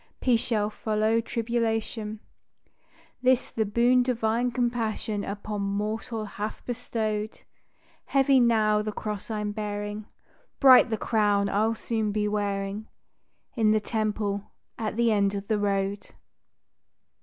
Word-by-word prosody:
Peace 245 Hz, -3 st, +3 dB
shall 215 Hz, -3 st, -1 dB
follow 220 Hz, +1 st, +1 dB
tribulation: 225 Hz, -2 st, -2 dB, 1.0 s
This 255 Hz, -1 st, +2 dB
the 220 Hz, -, 0 dB
boon 240 Hz, +4 st, +3 dB
Divine 240 Hz, -1 st, +1 dB
Compassion 230 Hz, -4 st, -1 dB
upon 205 Hz, +1 st, -4 dB
mortal 215 Hz, +3 st, -2 dB
hath 210 Hz, +1 st, -6 dB
bestowed; 220 Hz, -3 st, -3 dB, 0.6 s
Heavy 270 Hz, -1 st, +4 dB
now 215 Hz, -3 st, +3 dB
the 215 Hz, 0 st, -3 dB
cross 210 Hz, 0 st, -5 dB
I'm 210 Hz, -1 st, -2 dB
bearing; 205 Hz, 0 st, -4 dB, 0.5 s
Bright 260 Hz, -3 st, +8 dB
the 220 Hz, -, -1 dB
crown 205 Hz, -3 st, +1 dB
I'll 220 Hz, +3 st, +1 dB
soon 220 Hz, -2 st, -2 dB
be 210 Hz, 0 st, 0 dB
wearing 205 Hz, 0 st, -2 dB, 0.7 s
In 220 Hz, -4 st, +3 dB
the 215 Hz, -, +3 dB
Temple 210 Hz, -2 st, -2 dB, 0.2 s
at 215 Hz, -2 st, -3 dB
the 235 Hz, 0 st, +3 dB
end 200 Hz, -1 st, +2 dB
of 200 Hz, 0 st, -5 dB
the 215 Hz, -2 st, +1 dB
road. 200 Hz, 0 st, -1 dB
215 Hz, 120 wpm, -27 LUFS, 205-230 Hz, 1.0 s, Bright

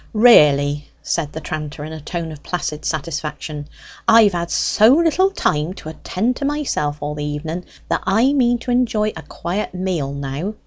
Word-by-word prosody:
"Really," 145 Hz, -, +5 dB, 0.2 s
said 155 Hz, -4 st, -1 dB
the 160 Hz, -, -6 dB
tranter, 150 Hz, -1 st, -5 dB
in 155 Hz, -, -7 dB
a 160 Hz, -, -7 dB
tone 165 Hz, +1 st, -4 dB
of 150 Hz, -2 st, -10 dB
placid 155 Hz, -3 st, -4 dB
satisfaction, 150 Hz, -1 st, -4 dB, 0.4 s
"I've 220 Hz, -3 st, +6 dB
had 170 Hz, -1 st, -2 dB
so 215 Hz, +4 st, +3 dB
little 340 Hz, +4 st, +3 dB
time 165 Hz, -, -1 dB
to 155 Hz, -, -8 dB
attend 220 Hz, +9 st, -2 dB
to -, -, -5 dB
myself 275 Hz, -, -1 dB
all 145 Hz, 0 st, -3 dB
the 150 Hz, 0 st, -5 dB
evenen, 155 Hz, +4 st, -4 dB, 0.2 s
that -, -, 0 dB
I 230 Hz, +8 st, +3 dB
mean 245 Hz, -3 st, +3 dB
to 250 Hz, -, -3 dB
enjoy 230 Hz, -4 st, +2 dB
a 160 Hz, -, -7 dB
quiet 185 Hz, +4 st, -4 dB
meal 180 Hz, -7 st, -2 dB
now! 140 Hz, +9 st, -4 dB
165 Hz, 175 wpm, -20 LUFS, 150-220 Hz, 0.4 s, I've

